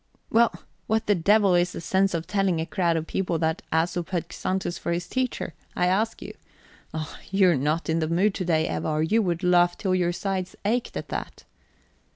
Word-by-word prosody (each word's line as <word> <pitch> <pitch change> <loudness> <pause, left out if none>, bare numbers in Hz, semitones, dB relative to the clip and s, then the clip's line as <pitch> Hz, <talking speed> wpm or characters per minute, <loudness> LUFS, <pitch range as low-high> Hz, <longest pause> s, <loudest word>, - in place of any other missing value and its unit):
"Well, 230 0 +5 0.4
what 220 +1 +1
the 205 - +4
devil 200 +2 +4
is 175 0 +2
the - - -5
sense 190 +2 +1
of 165 0 -3
telling 195 -3 +1
a 160 - -1
crowd 170 -2 +1
of 160 - -2
people 180 -1 -1
that 160 +1 0
Æsop 170 +1 0
had 170 -2 -3
Xanthus 185 -2 -2
for - - -3
his 175 +1 -2
teacher? 255 -7 -2 0.2
I 180 - +2
ask 210 +5 0
you. - - -8 0.6
Oh, 155 -1 -6
you 195 -2 +4
are - - +3
not 150 +5 0
in 165 0 +1
the 160 - 0
mood 185 +5 +2
to 185 - -3
day, 160 -2 +2
Eva, - - -2
or 155 0 +1
you 220 +8 +3
would 175 -2 -1
laugh 175 -1 +4
till 190 -3 0
your 180 -1 +2
sides 185 0 -3
ached 235 +4 0
at - - -6
that." - - -5
180 Hz, 210 wpm, -25 LUFS, 165-195 Hz, 0.6 s, Well